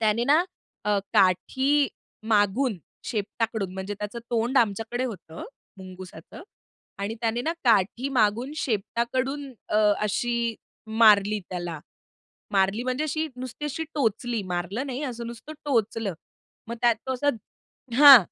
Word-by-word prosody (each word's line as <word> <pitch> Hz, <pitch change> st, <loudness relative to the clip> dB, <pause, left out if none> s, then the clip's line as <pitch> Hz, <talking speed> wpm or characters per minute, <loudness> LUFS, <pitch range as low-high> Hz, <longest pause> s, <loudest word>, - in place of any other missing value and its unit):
त्याने 220 Hz, +2 st, +2 dB
ना 305 Hz, +6 st, +4 dB, 0.4 s
अ, 210 Hz, -1 st, +2 dB
काठी 265 Hz, +10 st, +3 dB, 0.4 s
मागून, 210 Hz, +3 st, +2 dB, 0.3 s
शेपटाकडून 215 Hz, -2 st, -2 dB
म्हणजे 190 Hz, +2 st, -4 dB
त्याचं 210 Hz, +3 st, -5 dB
तोंड 240 Hz, +3 st, +2 dB
आमच्याकडे 225 Hz, +3 st, 0 dB
होतं 180 Hz, -9 st, -7 dB, 0.3 s
मुंगुसाचं 185 Hz, -, -10 dB, 0.6 s
आणि 200 Hz, +3 st, -3 dB
त्याने 230 Hz, +1 st, 0 dB
ना 320 Hz, -, 0 dB
काठी 230 Hz, +3 st, +3 dB
मागून 240 Hz, +1 st, +1 dB
शेपटाकडून 255 Hz, +4 st, -1 dB, 0.2 s
अ, -, -, +1 dB, 0.2 s
अशी 235 Hz, +2 st, 0 dB, 0.3 s
मारली 215 Hz, -2 st, +5 dB
त्याला. 175 Hz, -3 st, -4 dB, 0.7 s
मारली 195 Hz, +3 st, +2 dB
म्हणजे 255 Hz, +4 st, -1 dB
अशी 310 Hz, +1 st, -1 dB
नुसती 255 Hz, +3 st, -6 dB
अशी 295 Hz, +2 st, -3 dB
टोचली, 235 Hz, -4 st, 0 dB
मारलं 185 Hz, +8 st, -3 dB
नाही, 260 Hz, +2 st, -4 dB
असं 240 Hz, -3 st, -5 dB
नुसतं 235 Hz, +6 st, -8 dB
टोचलं. 225 Hz, -, 0 dB, 0.5 s
मग 235 Hz, -, -4 dB
त्यात 240 Hz, -1 st, +5 dB
तो 260 Hz, -, 0 dB
असा 285 Hz, +3 st, 0 dB, 0.7 s
हां. 280 Hz, -2 st, +12 dB
230 Hz, 125 wpm, -26 LUFS, 205-255 Hz, 0.7 s, हां